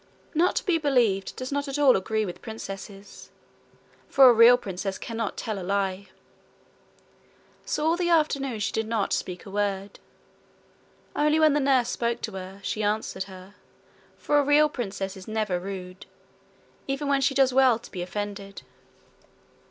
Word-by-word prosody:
Not 340 +3 +2
to - - -1
be 345 -4 +2
believed 240 -10 +1
does 255 +1 -6
not 285 0 -2
at 275 +1 -3
all 285 -3 +5
agree 215 +3 -1
with 180 - -7
princesses: 200 -2 -9 0.8
for 270 -1 +7
a - - +4
real 230 +2 +7
princess 195 -3 -5
cannot 225 -2 -4
tell 215 -3 -4
a - - -6
lie. 195 +1 -2 1.6
So 300 - -2
all 325 +1 +3
the 350 -1 0
afternoon 280 -7 +1
she 200 - -1
did 220 0 -2
not 220 -3 -1
speak 180 -1 -4
a 195 - -10
word. 200 -1 -2 1.2
Only 300 +1 +2
when 310 -2 +5
the 295 - +2
nurse 265 -3 +2
spoke 235 0 -2
to 220 - -4
her, 190 +1 -8
she 215 - -2
answered 205 -2 -2
her, 190 0 -12 0.6
for 295 - +2
a - - +3
real 295 +2 +4
princess 195 -7 -4
is 190 -1 -11
never 215 -4 -1
rude 185 -1 -8 0.8
even 275 +1 -2
when 280 -1 +2
she 270 +1 +1
does 265 -1 +3
well 260 -3 +5
to 235 - -15
be 180 - -5
offended. 200 +2 -6
220 Hz, 165 wpm, -26 LUFS, 195-275 Hz, 1.6 s, for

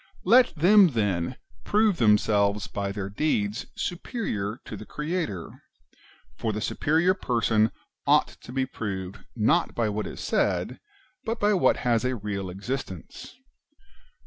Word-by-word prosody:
Let 240 +6 +5
them, 190 +5 +6
then, 100 - -1 0.3
prove 210 -3 +2
themselves 105 -2 +3
by 100 -1 -3
their 100 -1 -4
deeds 105 -2 -1
superior 125 - -3
to - - -7
the 105 - -8
Creator; 150 - -4 0.7
for 110 - -2
the 105 - -3
superior 160 - +2
person 115 - +1 0.4
ought - - +4
to - - -11
be 130 0 0
proved 100 -5 -5 0.2
not 110 -2 +2
by 115 -2 +1
what 105 +1 -3
is - - -8
said, - - 0 0.4
but 225 0 -3
by 205 +1 +3
wdiat 190 -4 +4
has 120 -2 +1
a 130 0 0
real 100 -3 -4
existence. 95 - -6
110 Hz, 135 wpm, -26 LUFS, 100-160 Hz, 0.7 s, them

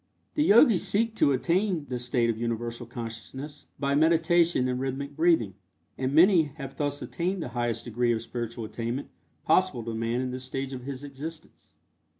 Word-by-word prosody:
The 300 - +2
Yogis 220 - +6
seek 220 +4 +1
to 140 - +4
attain 170 +4 +1
this 125 -1 -4
state 120 -1 +2
of 110 - -6
Universal 120 0 -3
Consciousness 120 +5 -8
by 140 -1 0
meditation 165 -1 +3
and 125 0 -1
rhythmic 135 +2 -4
breathing, 160 - +3 0.4
and 130 0 -2
many 170 +2 +6
have 135 -2 -7
thus 145 -1 -2
attained 180 +1 -2
the - - -5
highest 120 -2 -2
degree 120 0 +1
of 115 -1 -1
spiritual 120 -1 -5
attainment 115 +5 -4 0.4
possible 185 -11 +2
to 115 0 -4
man 115 +2 -1
in 130 -1 -2
this 130 0 -5
stage 135 +1 -4
of 125 -1 -7
his 140 0 -6
existence. 145 +3 -9
135 Hz, 170 wpm, -27 LUFS, 120-160 Hz, 0.4 s, Yogis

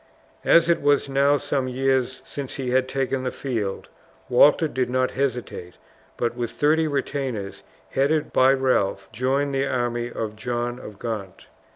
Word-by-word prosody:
As 170 0 +5
it 170 - +2
was 145 0 +3
now 140 +1 +3
some 135 -2 -1
years 130 0 0
since 140 -2 -6
he 130 -2 -3
had 130 0 +2
taken 135 0 -1
the 130 - -1
field, 115 -8 -3 0.4
Walter 145 +6 +5
did 130 -4 -2
not 130 0 +1
hesitate, 125 -9 -3 0.4
but 120 0 -1
with 120 -2 -2
thirty 155 +2 +2
retainers, 135 -8 -3 0.3
headed 145 +3 +1
by 130 +1 +5
Ralph, 115 -7 0
joined 135 +5 0
the 135 0 0
army 120 -2 -1
of 110 -2 -4
John 120 +2 -3
of 105 -5 -10
Gaunt. 100 -5 -6
130 Hz, 155 wpm, -24 LUFS, 120-140 Hz, 0.4 s, As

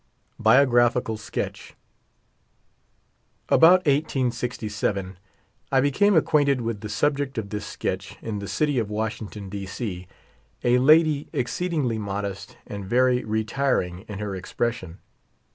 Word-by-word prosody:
BIOGRAPHICAL 120 -1 +4
SKETCH. 105 - -5 1.7
About 180 +3 +6
1867 120 - -1 0.5
I 135 - +4
became 185 +9 +3
acquainted 145 -4 +3
with 115 -3 -3
the 105 - -6
subject 140 +3 0
of 100 -3 -4
this 105 -1 -4
sketch - - -4
in 110 -2 -4
the 100 - -6
city 145 0 0
of 110 -3 -2
Washington, 105 -1 -4
D. 100 0 -6
C, 90 -3 -5 0.6
a 125 +1 +4
lady 155 +1 +4
ex 125 - -1
ceedingly 150 -11 -1
modest 100 -1 -5
and 100 -1 -7
very 125 +5 +2
retiring 110 -4 -1
in 105 - -6
her 105 -1 -4
expression. 95 -2 -3
115 Hz, 120 wpm, -24 LUFS, 105-140 Hz, 1.7 s, About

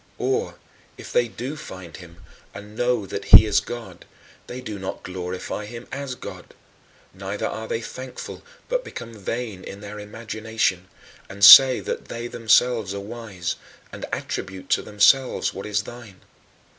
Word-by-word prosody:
Or, 435 +4 -1 0.4
if - - -10
they 485 - +3
do 130 +5 -6
find 95 - -10
him, 85 0 -14 0.3
and 105 +1 -10
know 120 -3 0
that - - -5
he - - +10
is 105 - +3
God, 120 -1 -8 0.4
they 125 - -6
do 110 -5 -6
not 95 - -6
glorify 90 +3 -5
him 120 +2 -9
as 140 -2 -5
God; - - -10 0.6
neither 100 +2 -4
are 110 0 -4
they 115 - -2
thankful 130 +2 -8 0.3
but - - -1
become 115 - -8
vain 110 -1 -5
in 100 - -9
their 105 +1 -8
imagination, 110 -3 -2 0.4
and 100 +1 +3
say 130 +3 +11
that - - -4
they 115 0 -6
themselves 115 -3 +2
are - - -3
wise, 100 -4 -5 0.3
and - - -7
attribute 95 0 -5
to - - +3
themselves 115 +6 +3
what 100 - -7
is 105 -1 0
thine. 110 -5 -11
110 Hz, 155 wpm, -23 LUFS, 100-120 Hz, 0.6 s, say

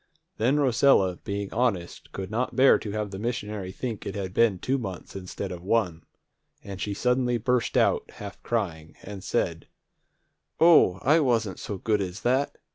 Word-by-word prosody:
Then 130 +7 +2
Rosella, 120 -9 +3
being 100 0 -5
honest, 110 -8 -1
could 95 0 -6
not 120 +4 -2
bear 135 +1 +6
to 105 - -6
have 105 -1 -3
the 95 - -6
missionary 105 -4 -4
think 115 +1 -5
it 95 - -5
had 95 -2 -4
been 110 -4 +3
two 135 +8 -1
months 95 -7 -7
instead 90 -2 -6
of 90 -1 -7
one, 95 -5 0 0.6
and 100 -1 -8
she 100 -1 -2
suddenly 125 +1 +1
burst 125 +1 0
out, - - +2
half 100 -1 -9
crying, 85 -9 -3
and 100 -1 -8
said, - - -2 0.9
"O, 160 - +6
I 155 +5 +5
wasn't 115 - 0
so 100 - -5
good 105 +2 0
as 95 +1 -5
that! 130 +3 0
105 Hz, 170 wpm, -26 LUFS, 95-125 Hz, 0.9 s, bear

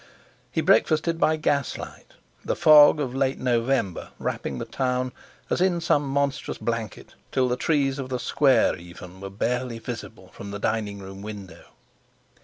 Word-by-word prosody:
He - - 0
breakfasted 165 +1 +3
by 155 - +3
gaslight, 145 -3 -3 0.3
the - - -1
fog 155 -2 +7
of 130 -4 -2
late 135 0 0
November 120 -5 0
wrapping - - -3
the - - -4
town 125 -1 -1 0.4
as - - -1
in 180 -2 +2
some 145 -4 +1
monstrous 140 0 -1
blanket 115 -3 -4 0.2
till 130 -1 +2
the 125 - 0
trees 140 0 0
of 130 -1 -5
the 130 - -1
Square 135 0 +3
even 90 +2 -12
were 100 - -6
barely 120 +4 -2
visible 115 -5 -8
from 100 - -9
the 100 - -5
dining 105 -1 -2
room 95 0 -9
window. 100 -3 -9
125 Hz, 155 wpm, -25 LUFS, 105-140 Hz, 0.4 s, fog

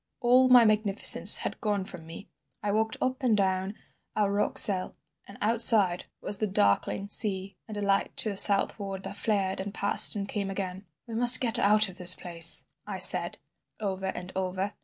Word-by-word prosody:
"All 255 +1 0
my 245 -2 +3
magnificence 215 -1 +5
had - - -9
gone 205 -3 -5
from 165 -3 -15
me. 165 - -14 0.4
I 205 - -5
walked 220 +1 -5
up 255 +2 -6
and 235 -5 -2
down 190 0 -5 0.4
our 205 -2 -3
rock 205 +1 -4
cell, 185 -3 0 0.3
and 200 - -17
outside 210 -5 +4 0.2
was 205 - -5
the 215 - -4
darkling 190 - -3
sea 195 -3 -2
and 215 -2 -11
a 205 - -7
light 200 0 -4
to 220 - 0
the 200 - -8
southward 195 -1 0
that 195 +1 -11
flared 200 -3 -5
and 195 +1 -9
passed 200 - +6
and 200 -1 -7
came 200 -1 -7
again. 190 0 -9 0.2
"'We 235 - -13
must 240 +2 +6
get 235 -2 0
out 210 +1 0
of 185 -1 -15
this 180 0 +4
place,' 170 -1 -2 0.2
I - - -9
said - - +1 0.4
over 190 -2 -7
and 180 -1 -10
over. 190 +1 -7
200 Hz, 185 wpm, -24 LUFS, 190-215 Hz, 0.4 s, passed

